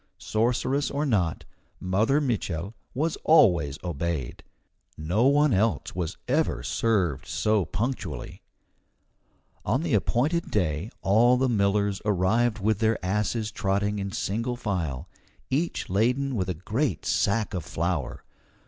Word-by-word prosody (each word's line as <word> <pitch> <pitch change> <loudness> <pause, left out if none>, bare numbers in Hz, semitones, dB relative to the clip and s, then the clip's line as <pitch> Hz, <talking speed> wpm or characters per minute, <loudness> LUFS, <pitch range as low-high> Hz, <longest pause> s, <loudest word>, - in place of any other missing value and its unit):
Sorceress 125 +5 0
or 145 +2 -1
not, 95 - 0 0.3
Mother 105 +10 +2
Mitchel 105 - -2 0.2
was 155 +5 0
always 85 - +4
obeyed. 85 -6 -3 0.6
No 90 +11 +1
one 145 -1 +4
else 100 -3 0
was 90 -2 -3
ever 150 +5 0
served 95 - 0
so 105 -3 +1
punctually. 100 - -4 1.2
On 130 +8 0
the 170 - -1
appointed 140 - +1
day 90 -1 -1
all 120 +6 +4
the 130 +1 +2
millers 100 -3 +1
arrived 105 +4 +2
with 105 0 0
their 110 -1 +2
asses 105 +3 -1
trotting 100 +1 -1
in 100 0 -3
single 115 +7 -2
file, 90 - -3 0.4
each 160 +6 -1
laden 125 +8 +1
with 95 -4 -1
a 90 - -1
great 105 - -2
sack 105 +1 +1
of 90 -4 -3
flour. 85 -3 -3
105 Hz, 125 wpm, -26 LUFS, 90-120 Hz, 1.2 s, always